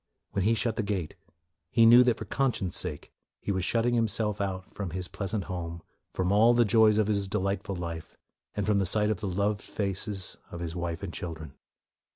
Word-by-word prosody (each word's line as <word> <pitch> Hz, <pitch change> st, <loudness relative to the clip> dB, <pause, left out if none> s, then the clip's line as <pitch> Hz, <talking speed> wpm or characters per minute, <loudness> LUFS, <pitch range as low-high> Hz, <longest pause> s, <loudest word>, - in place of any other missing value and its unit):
When 100 Hz, -1 st, 0 dB
he 115 Hz, +2 st, +4 dB
shut 115 Hz, 0 st, 0 dB
the -, -, +2 dB
gate, 100 Hz, -6 st, -2 dB, 0.6 s
he 115 Hz, +3 st, +5 dB
knew 120 Hz, +2 st, +9 dB
that 120 Hz, -2 st, +2 dB
for 110 Hz, -, -6 dB
conscience' 120 Hz, -7 st, -1 dB
sake 80 Hz, -5 st, -5 dB, 0.3 s
he -, -, -3 dB
was 95 Hz, -2 st, -1 dB
shutting 115 Hz, +4 st, +1 dB
himself 110 Hz, -2 st, 0 dB
out 95 Hz, -2 st, -3 dB
from 100 Hz, -3 st, -4 dB
his 90 Hz, +2 st, -4 dB
pleasant 100 Hz, 0 st, -3 dB
home, 85 Hz, -2 st, -5 dB, 0.3 s
from 95 Hz, 0 st, 0 dB
all 115 Hz, +4 st, +5 dB
the 120 Hz, 0 st, +5 dB
joys 110 Hz, 0 st, +5 dB
of 110 Hz, -, +3 dB
his 100 Hz, -1 st, 0 dB
delightful 100 Hz, 0 st, -2 dB
life, 85 Hz, -2 st, -6 dB, 0.4 s
and 105 Hz, -2 st, -1 dB
from 105 Hz, -1 st, +2 dB
the 95 Hz, -, +2 dB
sight 105 Hz, +3 st, +3 dB
of 100 Hz, -, -2 dB
the 105 Hz, -, -3 dB
loved 100 Hz, +2 st, 0 dB
faces 100 Hz, -1 st, -2 dB
of 85 Hz, -, -7 dB
his 85 Hz, -1 st, -4 dB
wife 85 Hz, 0 st, -3 dB
and 90 Hz, -4 st, -5 dB
children. 80 Hz, -5 st, -6 dB
100 Hz, 200 wpm, -28 LUFS, 90-110 Hz, 0.6 s, knew